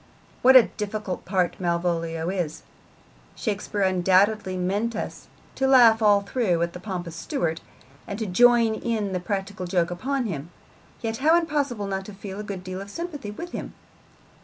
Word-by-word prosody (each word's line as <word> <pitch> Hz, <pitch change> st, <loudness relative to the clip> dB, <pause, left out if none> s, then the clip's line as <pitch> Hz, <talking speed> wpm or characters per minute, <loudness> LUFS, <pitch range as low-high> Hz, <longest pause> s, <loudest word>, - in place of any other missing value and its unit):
What 260 Hz, +1 st, +7 dB
a 255 Hz, -, +11 dB
difficult 210 Hz, -3 st, -5 dB
part 185 Hz, -2 st, 0 dB
Malvolio 170 Hz, -1 st, -1 dB
is! 175 Hz, -5 st, -3 dB, 0.7 s
Shakespeare 205 Hz, -1 st, -3 dB
undoubtedly 190 Hz, +1 st, +2 dB
meant 205 Hz, +6 st, -1 dB
us -, -, -6 dB, 0.3 s
to 265 Hz, -, 0 dB
laugh 235 Hz, -4 st, +6 dB
all 205 Hz, -2 st, +5 dB
through 200 Hz, -4 st, 0 dB
at 170 Hz, -, -3 dB
the 180 Hz, -, -7 dB
pompous 180 Hz, -4 st, -5 dB
steward, 165 Hz, 0 st, -2 dB, 0.5 s
and 200 Hz, -, -4 dB
to 220 Hz, -, -2 dB
join 230 Hz, +3 st, +5 dB
in 220 Hz, -3 st, -2 dB
the 180 Hz, -, 0 dB
practical 195 Hz, 0 st, -4 dB
joke 175 Hz, -1 st, +1 dB
upon 260 Hz, +8 st, -2 dB
him, 170 Hz, -10 st, -3 dB
and 170 Hz, +8 st, -22 dB
yet 225 Hz, 0 st, -2 dB
how 315 Hz, +6 st, +4 dB
impossible 285 Hz, -10 st, -1 dB
not 195 Hz, -1 st, -3 dB
to 210 Hz, -, -10 dB
feel 195 Hz, 0 st, -7 dB
a -, -, -4 dB
good 200 Hz, -3 st, -6 dB
deal 185 Hz, +1 st, -5 dB
of 200 Hz, -, -9 dB
sympathy 295 Hz, -3 st, -6 dB
with 340 Hz, +12 st, -7 dB
him! -, -, -6 dB
200 Hz, 170 wpm, -25 LUFS, 180-230 Hz, 0.7 s, a